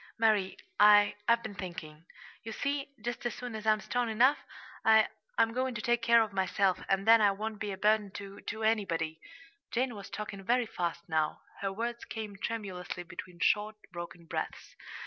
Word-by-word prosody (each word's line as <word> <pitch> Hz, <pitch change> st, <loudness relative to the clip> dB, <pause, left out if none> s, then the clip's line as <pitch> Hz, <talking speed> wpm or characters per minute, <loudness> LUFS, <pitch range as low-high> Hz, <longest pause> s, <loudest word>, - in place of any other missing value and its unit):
"Mary, 215 Hz, -4 st, +2 dB, 0.2 s
I 205 Hz, 0 st, +7 dB
I've 235 Hz, 0 st, +4 dB
been 215 Hz, -, -5 dB
thinking. 170 Hz, -4 st, -8 dB, 0.3 s
You 225 Hz, -, -6 dB
see, 280 Hz, +2 st, -2 dB, 0.2 s
just 240 Hz, 0 st, -3 dB
as 240 Hz, -, -5 dB
soon 245 Hz, -2 st, -6 dB
as 220 Hz, 0 st, -5 dB
I'm 215 Hz, 0 st, +4 dB
strong 245 Hz, -1 st, -1 dB
enough, 245 Hz, +6 st, +4 dB, 0.4 s
I 220 Hz, -1 st, +6 dB, 0.3 s
I'm 225 Hz, 0 st, +3 dB
going 255 Hz, 0 st, -1 dB
to 215 Hz, -, -3 dB
take 240 Hz, 0 st, +2 dB
care 235 Hz, 0 st, +6 dB
of 215 Hz, -2 st, -6 dB
myself, 190 Hz, 0 st, +1 dB
and 195 Hz, +1 st, +1 dB
then 225 Hz, 0 st, +8 dB
I 205 Hz, -, +6 dB
won't 215 Hz, +1 st, -5 dB
be 205 Hz, 0 st, -3 dB
a 190 Hz, -, -5 dB
burden 210 Hz, 0 st, +3 dB
to 200 Hz, 0 st, -8 dB
to 220 Hz, 0 st, -5 dB
anybody." 165 Hz, -8 st, 0 dB, 0.5 s
Jane 250 Hz, +1 st, 0 dB
was 200 Hz, -2 st, -9 dB
talking 205 Hz, -2 st, -6 dB
very 245 Hz, +4 st, +2 dB
fast 170 Hz, -5 st, -3 dB
now. 155 Hz, -1 st, 0 dB, 0.2 s
Her 195 Hz, -1 st, -1 dB
words 235 Hz, +4 st, -3 dB
came 215 Hz, -3 st, -6 dB
tremulously 195 Hz, -5 st, -4 dB
between 175 Hz, +1 st, -9 dB
short, 210 Hz, +1 st, +2 dB, 0.2 s
broken 170 Hz, 0 st, -7 dB
breaths. -, -, -5 dB
210 Hz, 185 wpm, -31 LUFS, 190-230 Hz, 0.5 s, then